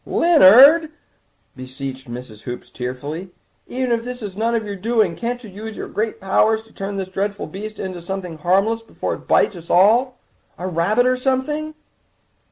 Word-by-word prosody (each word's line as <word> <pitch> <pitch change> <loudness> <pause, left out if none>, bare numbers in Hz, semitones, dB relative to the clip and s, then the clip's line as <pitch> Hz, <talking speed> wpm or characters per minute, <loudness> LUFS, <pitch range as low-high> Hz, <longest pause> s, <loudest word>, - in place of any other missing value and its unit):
"Leonard," 305 - +6 0.7
beseeched 130 0 -8
Mrs. 120 -3 -9
Hoops 125 -1 -8
tearfully, 140 +8 -6 0.4
"even 255 0 -2
if 230 -1 +1
this 245 -1 -7
is 195 -3 -6
none 230 +3 0
of 220 -2 -1
your 205 -1 -5
doing 220 +3 +1
can't 245 +1 -4
you 215 - -10
use 215 +3 -8
your - - -5
great 220 +1 -3
powers 220 +3 +2
to 225 - -23
turn 195 0 -5
this 190 -1 -4
dreadful 200 +2 -3
beast 215 +3 -8
into 185 -2 -5
something 180 -2 -6
harmless 195 +7 +1
before 225 - -4
it - - -10
bites 205 - +3
us 170 -1 -12
all—a 220 -1 +1
rabbit 185 +8 +1
or 255 0 +3
something?" 295 +4 -1
205 Hz, 170 wpm, -20 LUFS, 180-240 Hz, 0.7 s, Leonard